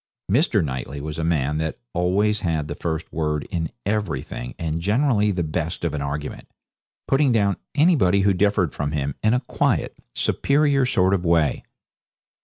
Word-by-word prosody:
Mr. 115 - +3
Knightley 65 +1 -4
was 75 +2 -5
a - - -1
man 75 -2 0
that 80 0 -2 0.2
always 100 +5 +1
had 80 -5 -1
the - - -4
first 80 -1 -4
word 75 -2 -1
in 80 -4 -1 0.2
everything, 90 - -3
and 80 0 -2
generally 105 - +2
the 90 -4 0
best 80 +2 -3
of 85 - -1
an 75 - -2
argument 70 +1 -5 0.6
putting 135 -1 +3
down 100 -4 +2 0.2
anybody 140 - +4
who 100 0 +3
differed 95 -3 +1
from 75 +1 -3
him 70 -2 -1
in 110 +2 +3
a 125 - 0
quiet, 120 - 0 0.2
superior 140 -2 +2
sort 95 -5 +2
of 95 -3 0
way. 85 -3 +2
85 Hz, 165 wpm, -23 LUFS, 75-105 Hz, 0.6 s, anybody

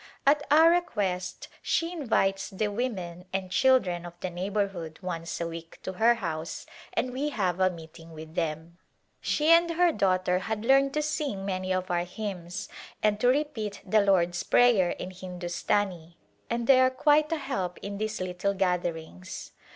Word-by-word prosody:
At 290 +1 +5
our 320 +3 +7
request 190 - -1
she 330 +1 0
invites 205 - 0
the 210 +1 -1
women 190 -6 -4
and 190 -1 -3
children 185 -9 +3
of 175 0 -10
the 185 - -4
neighborhood 185 -3 -3
once 165 -2 -4
a 170 - -2
week 165 0 -9
to 190 - -4
her 230 +5 +4
house 165 -6 -4 0.3
and 255 -1 -1
we 280 +4 -1
have 190 - -1
a 185 0 +4
meeting 165 -1 -11
with 160 0 -10
them. 165 +1 -3 0.4
She 305 +1 +1
and 340 +1 +6
her 345 +1 +3
daughter 185 - +1
had 220 +2 -4
learned 275 +2 +4
to 300 - +1
sing 285 -10 -2
many 185 -1 -2
of 185 0 -1
our 175 0 +1
hymns 190 -1 -5 0.4
and 210 -1 +2
to 245 - +2
repeat 245 -7 0
the 210 +2 +4
Lord's 175 -3 +2
Prayer 230 -8 +4
in 185 - -5
Hindustani 180 -1 -3 0.3
and 235 0 -1
they 260 +1 +6
are 255 0 +5
quite 300 +4 +3
a 325 - +1
help 190 - -3
in 200 0 -5
these 215 0 -2
little 185 +2 -2
gatherings. 170 - -3
195 Hz, 165 wpm, -28 LUFS, 175-245 Hz, 0.4 s, our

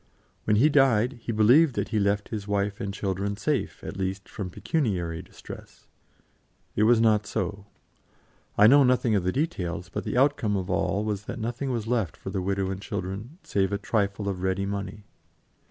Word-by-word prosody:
When 105 - +3
he 125 +8 +5
died, 135 -4 +3
he 115 - -3
believed 120 +7 +5
that - - -2
he 110 - +1
left 100 0 0
his 105 -2 -5
wife 100 0 -1
and 100 - -2
children 100 0 -2
safe, 135 +6 -2
at - - -6
least, 95 0 -3
from 95 -3 -6
pecuniary 90 - -1
distress. 90 - -12 0.9
It 105 - +3
was 120 0 +5
not 105 -3 +3
so. 100 0 -3 0.9
I 105 - +7
know 140 +5 +8
nothing 125 -3 +3
of 100 -4 +2
the 90 - +1
details, 90 - -2
but - - -4
the - - -2
outcome 125 -7 +2
of 95 0 -3
all 100 +2 0
was 105 -1 -3
that - - -5
nothing 120 +4 -3
was 115 -4 -2
left 115 -7 -1
for - - -7
the 95 - -2
widow 95 0 -1
and 95 0 -5
children, 100 - -5
save 95 -1 0
a 100 - 0
trifle 100 -1 -1
of 95 -2 -2
ready 95 +1 0
money. 100 +1 -5
105 Hz, 185 wpm, -26 LUFS, 95-115 Hz, 0.9 s, know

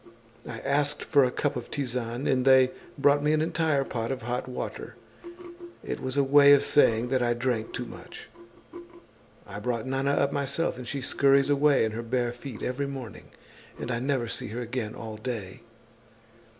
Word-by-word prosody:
I - - -6
asked 145 +1 0
for 145 -3 +4
a 125 - +2
cup 145 +3 -2
of - - -6
tisane 125 -2 -3
and 130 -1 +2
they 130 -1 +5 0.3
brought 145 0 +4
me 150 +1 +2
an 155 - +2
entire 160 -4 +1
pot 115 -3 -4
of 130 -2 -4
hot 120 +2 -3
water. 125 - -6 0.9
It - - -4
was 130 +1 -3
a 140 - +4
way 140 +1 +7
of 140 0 +5
saying 120 -5 +3
that 130 -1 +1
I 120 -1 +1
drank 120 -2 -2
too 125 - -4
much. - - -11 1.2
I - - -8
brought 120 -3 -2
Nana 135 +2 0
up 140 0 +1
myself 140 +1 -1
and 125 - -8
she 140 - -3
scurries 140 +2 +3
away 145 -3 +4
in 110 - -2
her 110 +2 -4
bare 120 +1 -1
feet 120 -1 -9
every 140 +3 -2
morning 135 -5 -8 0.5
and 125 - -4
I 115 - -1
never 130 -2 -1
see - - -4
her 115 +4 -5
again 120 -2 -4
all 110 -2 -7
day. 110 -5 -6
130 Hz, 185 wpm, -27 LUFS, 120-140 Hz, 1.2 s, way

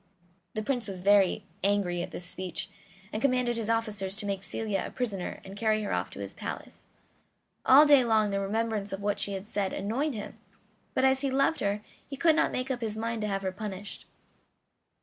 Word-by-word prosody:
The 215 - -1
Prince 245 0 -1
was 190 -2 -6
very 200 -1 +4 0.2
angry 195 -3 +1
at - - -4
this 180 - -7
speech, 180 -1 -5 0.4
and 215 - -2
commanded 250 -2 +2
his 225 -1 -3
officers 210 -4 0
to 210 0 +2
make 200 -1 -2
Celia 200 -1 -1
a - - -5
prisoner 205 -8 -3
and 195 +1 -9
carry 215 0 +1
her 205 - -2
off - - -1
to - - -10
his - - -5
palace. - - -7 0.8
All 280 +4 +9
day 285 -3 +7
long 220 -3 +3
the 200 - 0
remembrance 210 0 -1
of 195 +1 -5
what 205 0 0
she 200 - 0
had 195 +1 -5
said 200 -3 -1
annoyed 245 +8 -1
him, 210 - -7 0.6
but 260 - +3
as 265 0 +4
he 275 - +1
loved 275 +4 +2
her 205 +1 0 0.3
he 275 - -6
could 320 +1 +5
not - - +3
make 255 +1 -2
up 250 -2 -2
his 220 -1 -2
mind 230 0 -2
to 210 - -1
have 195 -1 -2
her 190 - -1
punished. 200 0 -7
210 Hz, 210 wpm, -29 LUFS, 195-240 Hz, 0.8 s, All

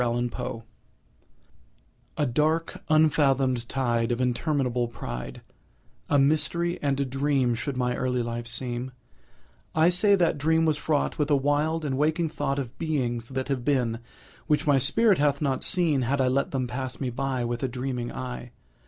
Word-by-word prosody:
IMITATION 120 0 -2 1.5
A 150 - +2
dark 155 +6 0
unfathom'd 135 -6 +3
tide 120 -3 0
Of 120 - -1
interminable 125 -1 0
pride— 60 - -7 0.7
A 145 - +4
mystery, 155 +5 +1
and 140 -1 0
a 140 - +1
dream, 135 -1 +1
Should 130 +3 -4
my 125 -1 0
early 125 -1 -1
life 120 0 -4
seem; 125 +1 -3 0.8
I 160 +2 +5
say 200 +3 +4
that 170 -5 +1
dream 160 +2 +2
was 155 -2 +2
fraught 150 0 -1
With 150 0 +1
a 145 - +5
wild, 150 +3 +1
and 135 -2 -1
waking 160 +2 +1
thought 140 -2 -2
Of 130 -3 -5
beings 125 -7 -2
that 130 0 -3
have 130 -3 -1
been, 120 -5 +1 0.5
Which 150 - +2
my 145 -2 +4
spirit 190 - +4
hath 145 -1 +2
not 140 -3 -1
seen, 165 -8 +2
Had 135 +3 0
I 130 -1 +3
let 135 +2 +1
them 130 -2 -1
pass 130 +1 -5
me 130 -3 -2
by, 130 0 -2
With 120 0 -3
a 135 - 0
dreaming 125 -1 -4
eye! 125 -1 -6
135 Hz, 165 wpm, -26 LUFS, 125-150 Hz, 1.5 s, I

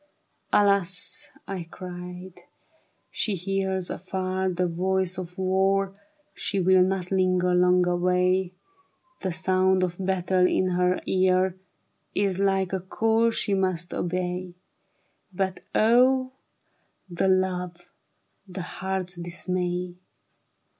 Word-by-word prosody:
" - - -46
Alas," 200 -3 +2 0.2
I 185 -4 -5
cried, 180 0 -9 0.4
" - - -38 0.3
she 210 - -1
hears 190 0 -2
afar 185 0 -2
I'he 180 0 -1
voice 185 +1 0
of 180 -1 -8
war; 195 +1 +1 0.4
She 200 - -2
will 185 0 +5
not 185 0 0
linger 185 -1 +2
long 180 0 +4
away; 180 +1 +1 0.7
The 190 - -1
sound 185 +1 +2
of 180 +1 -3
battle 185 -1 +2
in 185 0 +1
her 180 0 +1
ear 185 0 +2 0.6
Is 195 -2 +1
like 195 -1 +1
a 190 - 0
call 225 +5 +1
she 210 -3 -1
must 185 -3 0
obey: 180 0 -3 0.4
" 200 - -42
But 190 -1 -1 0.2
O 255 +3 +4 0.8
the 180 +1 -1
love, 180 -2 0 0.6
the 185 -1 -6
heart's 185 0 -4
dismay 180 +1 -2
185 Hz, 115 wpm, -26 LUFS, 180-190 Hz, 0.8 s, will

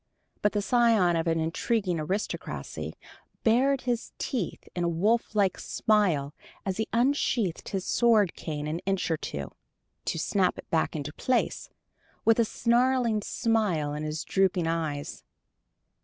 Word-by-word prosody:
But 210 - +2
the 205 -1 0
scion 225 -7 +4
of 165 0 0
an 165 0 +2
intriguing 180 +2 0
aristocracy 190 +7 -4 0.5
bared 260 +4 +3
his 240 -2 -2
teeth 235 -10 -3
in 175 - -1
a 170 - +2
wolf 215 +7 +1
like 195 -3 +2
smile 175 -10 +1 0.3
as 190 -2 -2
he 220 - -1
unsheathed 235 - +1
his 190 -2 -3
sword 220 -6 +3
cane 150 -2 -5
an 155 +2 -2
inch 195 -3 0
or 160 - +2
two, 70 - -5 0.5
to - - -1
snap 185 +3 +1
it - - -10
back 160 0 +1
into 145 -1 -4
place, 255 -1 0 0.6
with 225 +1 +5
a 230 - +5
snarling 235 -1 +2
smile 200 -10 0
in 150 - -4
his 155 +1 -3
drooping 190 -3 +1
eyes. 160 -3 -3
195 Hz, 145 wpm, -28 LUFS, 165-230 Hz, 0.6 s, with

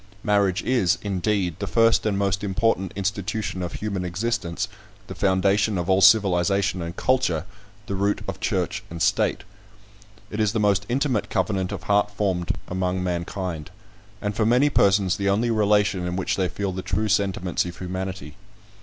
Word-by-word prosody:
Marriage 100 -3 +2
is, 105 -8 +2
indeed, 95 -3 -1
the 100 - -3
first 115 +2 +3
and 100 -2 0
most 100 0 0
important 100 -2 0
institution 100 0 -2
of 90 -1 -4
human 100 -3 -3
existence 90 0 -2 0.4
the - - -8
foundation 100 +2 +2
of 90 +2 -1
all 95 +1 +3
civilisation 100 -1 +4
and 85 +1 -5
culture 110 - +1 0.4
the 100 - -4
root 100 +1 0
of - - -5
church - - -1
and 85 - -7
state. - - +1 0.9
It 105 - -4
is 105 -1 +2
the 115 - 0
most 100 -1 +2
intimate 130 -3 0
covenant 95 -1 -1
of - - -5
heart 105 0 +2
formed 95 -4 -1
among 90 0 -1
mankind; 85 -2 -3 0.5
and 105 -1 -2
for 110 - +1
many 125 +6 +3
persons 95 -3 +3
the 100 0 0
only 115 +4 +1
relation 105 -4 +2
in 90 - -3
which 95 - -1
they 95 -1 0
feel 100 -1 -3
the 95 0 -4
true 110 +3 -1
sentiments 95 -3 0
of 90 0 -7
humanity. 95 -4 -5
100 Hz, 165 wpm, -24 LUFS, 90-105 Hz, 0.9 s, civilisation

